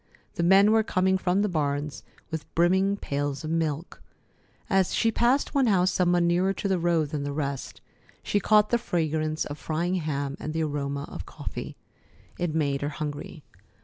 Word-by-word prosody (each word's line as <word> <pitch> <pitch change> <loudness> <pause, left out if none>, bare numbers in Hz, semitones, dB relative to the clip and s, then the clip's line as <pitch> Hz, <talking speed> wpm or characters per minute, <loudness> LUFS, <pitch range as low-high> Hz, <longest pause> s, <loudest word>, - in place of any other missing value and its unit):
The - - -2
men 195 +4 +6
were 220 0 +5
coming 190 -2 +1
from 190 +2 +1
the - - +2
barns 145 -4 -2 0.3
with 160 -1 -5
brimming 190 +4 +3
pails 145 -3 -3
of 155 - -3
milk. 165 0 -2 0.7
As 190 -2 +2
she 225 - +2
passed 245 +7 +2
one 275 -3 +3
house 185 -3 +3
somewhat 175 -1 +2
nearer 180 +3 +2
to 200 - -3
the 190 -2 +1
road 165 -3 +1
than 150 -1 -3
the 145 0 -3
rest, 140 -2 -4 0.4
she 205 - +1
caught 210 +1 +4
the 240 - +3
fragrance 155 -4 -1
of 145 +1 -7
frying 170 +3 -1
ham 140 -2 -3
and 155 - -4
the 160 0 0
aroma 140 -1 -2
of - - -8
coffee. - - -7 0.6
It 175 -3 -1
made 140 -3 0
her 145 - -1
hungry. 150 0 -6
165 Hz, 180 wpm, -26 LUFS, 150-190 Hz, 0.7 s, men